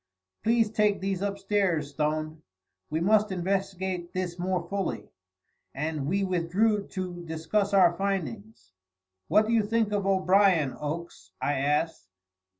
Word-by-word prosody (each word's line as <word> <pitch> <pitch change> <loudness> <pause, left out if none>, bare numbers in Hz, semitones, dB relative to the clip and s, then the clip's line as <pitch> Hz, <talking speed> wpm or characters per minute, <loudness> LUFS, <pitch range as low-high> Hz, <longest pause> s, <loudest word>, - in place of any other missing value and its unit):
"Please 225 -1 +2
take 210 -2 +2
these 195 -1 -2
upstairs, 195 -6 0
Stone; 155 +1 -2 0.5
we 155 - -1
must 210 +3 +3
investigate 190 -1 -2
this 180 -1 -3
more 180 -1 -1
fully," 195 +1 -3 0.7
and 150 0 -2
we 195 +5 +1
withdrew 195 +4 +1
to 180 -2 -5
discuss 165 +6 -1
our 180 -4 +5
findings. 120 - -4 0.6
"What 215 - +4
do 225 - 0
you 230 - +4
think 220 0 0
of 200 -2 0
O'Brien, 190 -6 +3
Oakes?" 150 - -6
I 145 - 0
asked. 145 - 0
185 Hz, 130 wpm, -27 LUFS, 160-200 Hz, 0.7 s, our